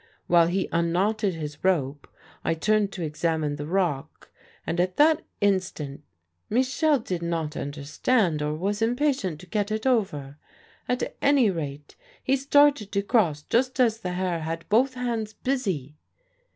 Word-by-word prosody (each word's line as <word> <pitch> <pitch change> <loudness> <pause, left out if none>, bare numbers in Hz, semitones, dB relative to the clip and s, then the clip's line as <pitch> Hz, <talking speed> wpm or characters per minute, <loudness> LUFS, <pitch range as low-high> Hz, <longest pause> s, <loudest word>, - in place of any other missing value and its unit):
While 170 -1 +5
he 185 +2 0
unknotted 185 +4 +1
his 150 -2 -7
rope 145 -7 0 0.4
I 165 - +1
turned 210 +4 +1
to 180 - -4
examine 155 -1 -1
the 145 0 -5
rock, 170 -6 -2 0.3
and 170 - -2
at 180 +1 0
that 310 +2 +5 0.2
instant... 185 -8 -1 0.5
Michel 265 +5 +2
did 185 -8 -4
not 165 -3 -2
understand, 150 - 0
or 150 +1 -1
was 200 +6 -2
impatient 240 - 0
to - - -12
get 205 +3 -1
it 215 +2 -2
over... 155 - 0 0.5
at 250 0 -1
any 275 -7 +4
rate 145 -4 -6 0.3
he 265 - +2
started 280 -5 +3
to 200 -1 +1
cross 175 - +2
just 255 - 0
as 225 -3 +3
the 180 -5 -4
Herr 180 -2 -1
had 165 +1 -5
both 255 +5 +3
hands 230 -4 -2
busy. 190 - -2
185 Hz, 150 wpm, -26 LUFS, 155-230 Hz, 0.5 s, While